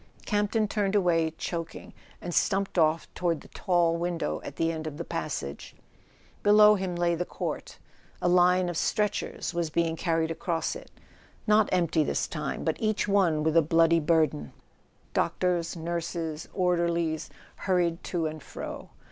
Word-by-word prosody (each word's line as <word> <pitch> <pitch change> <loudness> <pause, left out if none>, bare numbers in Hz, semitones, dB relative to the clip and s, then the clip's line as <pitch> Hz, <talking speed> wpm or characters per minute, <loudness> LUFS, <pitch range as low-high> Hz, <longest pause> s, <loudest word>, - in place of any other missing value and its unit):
Campton 210 +1 +1
turned 205 -1 0
away, 170 -5 +3
choking, 165 -1 -5 0.3
and 175 - -5
stumped 195 +1 +1
off 155 0 +2
toward 170 -3 -1
the - - -14
tall 175 -3 +1
window 175 0 -2
at - - -7
the 165 0 +1
end 160 -1 -5
of 145 -2 -6
the 170 - -4
passage. 150 - -5 0.7
Be¬ 205 - +4
low 210 0 +8
him 190 -3 -2
lay 175 0 +1
the 170 +1 -1
court. - - -5 0.4
A - - 0
line 180 +1 +4
of 175 -2 -3
stretchers 210 -3 -1
was 170 -2 -1
being 165 0 0
carried 165 -1 0
across 165 0 -2
it, - - -10 0.6
not 215 -1 +4
empty 170 -3 +2
this - - -1
time, - - -4
but - - 0
each 215 -2 0
one 180 -7 +2
with 160 0 +1
a 165 - +7
bloody 165 +1 +4
burden. 155 - +1 0.6
Doctors, 175 -2 0
nurses, 165 -1 -4
orderlies 170 -3 0 0.3
hurried 175 -3 0
to 170 -3 -1
and 155 -1 -4
fro. - - -8
170 Hz, 155 wpm, -28 LUFS, 165-185 Hz, 0.7 s, low